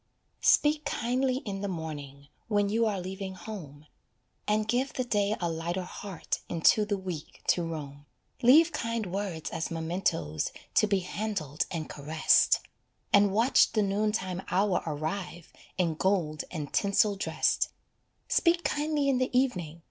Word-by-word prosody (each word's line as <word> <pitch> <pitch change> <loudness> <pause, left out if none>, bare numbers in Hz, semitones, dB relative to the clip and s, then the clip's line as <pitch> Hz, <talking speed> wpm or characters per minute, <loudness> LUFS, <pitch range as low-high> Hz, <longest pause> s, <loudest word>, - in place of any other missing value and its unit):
Speak 300 0 +4
kindly 255 +2 0
in 195 -2 -4
the 200 - -2
morning, 145 -5 -6 0.2
When 205 -2 +2
you 225 +2 +2
are 205 -3 -1
leaving 190 +1 -5
home, 155 -9 -9 0.6
And 210 0 +1
give 250 +4 0
the 255 - -1
day 210 -3 +1
a 175 - 0
lighter 170 +3 -2
heart 180 -1 -5
Into 175 +5 +4
the 205 -1 -1
week 180 -5 -7
to 175 - +4
roam. 145 -4 -6 0.3
Leave 305 +7 +7
kind 230 -6 -2
words 185 -4 -4
as 160 -1 -2
mementoes 160 - -1 0.2
To 215 - +4
be 200 -2 +1
handled 180 -6 -3
and 160 -3 -4
caressed, 155 +2 +3 0.5
And 200 -1 +6
watch 230 +6 +4
the 215 -2 +2
noon 205 +2 +1
time 185 -3 -3
hour 190 +1 +2
arrive 160 +3 -4 0.2
In 175 -3 +1
gold 160 -3 0
and 150 -5 -6
tinsel 200 +1 +3
dressed. 195 - +1 0.6
Speak 345 0 +3
kindly 295 -1 0
in 265 -2 +2
the 255 - +1
evening! 175 - -2
195 Hz, 150 wpm, -29 LUFS, 165-215 Hz, 0.6 s, Leave